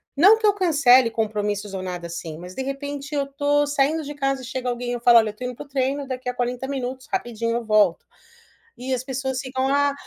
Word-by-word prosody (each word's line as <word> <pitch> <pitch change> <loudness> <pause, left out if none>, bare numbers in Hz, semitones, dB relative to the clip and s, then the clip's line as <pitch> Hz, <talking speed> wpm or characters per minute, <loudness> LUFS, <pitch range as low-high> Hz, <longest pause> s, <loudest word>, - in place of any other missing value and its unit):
Não 390 +10 +7
que 445 - -2
eu 410 - +5
cancele 280 - +5
compromissos 210 -2 -2
ou 190 - -3
nada, 180 -2 -5
assim, 165 -2 -6
mas, 180 +2 -9
de - - -3
repente, 280 +1 -5
eu 280 -1 +1
tô 290 +1 +2
saindo 290 +3 +1
de 290 +1 -6
casa 275 -2 -1
e - - -7
chega 255 0 -3
alguém 245 0 -3
eu 240 - -3
falo: 235 0 +6
"Olha 220 -1 +4
eu 210 - -9
tô 235 - -9
indo 250 -1 -4
para - - -9
o - - -21
treino 275 +1 -1
daqui 255 -1 -4
a - - -2
40 250 +1 -2
minutos 260 -1 -4
rapidinho 230 -1 -2
eu 240 - -5
volto". 210 -5 +3 0.7
E 260 +1 -3
as 250 -1 -2
pessoas 265 0 -3
ficam: 260 0 -2
"Ah" 285 0 +3
255 Hz, 240 wpm, -23 LUFS, 230-280 Hz, 0.7 s, Não